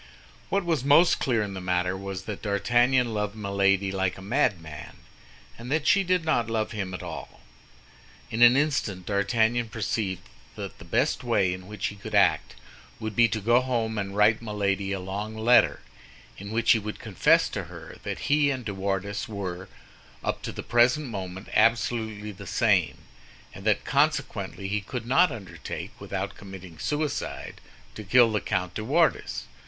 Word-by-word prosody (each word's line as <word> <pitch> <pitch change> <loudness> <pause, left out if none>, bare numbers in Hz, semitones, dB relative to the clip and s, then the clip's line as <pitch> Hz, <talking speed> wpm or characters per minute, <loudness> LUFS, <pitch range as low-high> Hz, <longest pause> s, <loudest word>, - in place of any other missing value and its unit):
What 200 -2 0
was 165 -7 0
most 150 +5 +5
clear 120 -6 +1
in 100 -1 -5
the 95 - -6
matter 90 0 0
was 95 -1 -6
that 105 0 -6
D'Artagnan 120 +4 +2
loved 105 0 -2
Milady 100 -2 +1
like 95 -1 -1
a - - -10
madman, 95 - -2 0.6
and 120 +3 -7
that 155 0 +1
she 195 +4 +4
did 180 -2 +1
not 120 -8 +1
love 110 -1 -1
him 95 -4 -4
at - - -7
all. - - -8 0.9
In 115 - -2
an 120 +2 +8
instant 135 - 0
D'Artagnan 110 +3 +1
perceived 105 -4 -2 0.3
that 100 -2 -7
the 95 - -11
best 125 - 0
way 100 -7 +2
in 90 0 -9
which 105 -1 -5
he 105 - -9
could 105 +1 -6
act 90 -6 +3 0.4
would 110 -1 -5
be 115 +1 +6
to 110 0 -2
go 120 +4 +4
home 115 -4 -1
and 100 -1 -4
write 110 +2 +4
Milady 100 -3 -1
a 100 - -2
long 100 +4 -5
letter, 120 +3 +4 0.6
in 100 +1 -8
which 115 +2 +2
he 115 - +5
would 105 0 -6
confess - - +3
to - - -4
her - - -11
that - - -5
he 145 0 +3
and 130 -3 -3
De 100 - -3
Wardes 100 +1 -2
were, 95 -3 -5 0.5
up - - -2
to - - -5
the - - -7
present 125 +6 +3
moment 95 -2 -6
absolutely 110 -1 +1
the 100 0 -11
same, 100 -9 +2 0.6
and - - -11
that - - +2
consequently 95 - 0
he 105 +1 -1
could 115 +3 -6
not 145 +7 +4
undertake, 105 -6 -7
without - - -4
committing 95 -4 -11
suicide, 150 0 -3 0.3
to 110 - -8
kill 115 +3 +5
the 105 - 0
Comte 90 -3 -2
de 110 - -4
Wardes. 150 +3 +1
105 Hz, 175 wpm, -26 LUFS, 95-120 Hz, 0.9 s, an